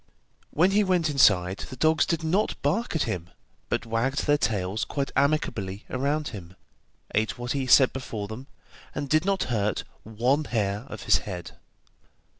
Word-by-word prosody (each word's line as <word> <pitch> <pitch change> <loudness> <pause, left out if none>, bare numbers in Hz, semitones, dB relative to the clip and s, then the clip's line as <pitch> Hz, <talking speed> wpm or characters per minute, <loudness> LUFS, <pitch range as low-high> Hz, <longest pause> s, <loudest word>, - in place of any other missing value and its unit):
When 180 +5 +3
he 210 +1 +4
went 180 -5 +1
inside, 95 -9 +4
the - - -7
dogs 160 +4 +3
did 165 -1 -1
not 185 +7 0
bark 175 - 0
at 160 - +2
him, 85 -1 -4 0.4
but - - -1
wagged 115 +5 -1
their 145 - +4
tails 100 -3 -1
quite 140 -1 -3
amicably 110 -9 0
around 145 +4 -1
him, 95 -4 -10 0.6
ate 110 +3 0
what 120 0 -4
he 135 -2 -1
set 130 +1 +6
before 115 -6 -5
them, 115 +6 -8 0.5
and 145 -1 -3
did 155 +5 +2
not 195 -1 +1
hurt 105 -3 0 0.2
one 125 +7 0
hair 105 -2 -1
of 110 - -8
his - - +4
head. 90 -4 -7
130 Hz, 165 wpm, -26 LUFS, 105-155 Hz, 0.6 s, set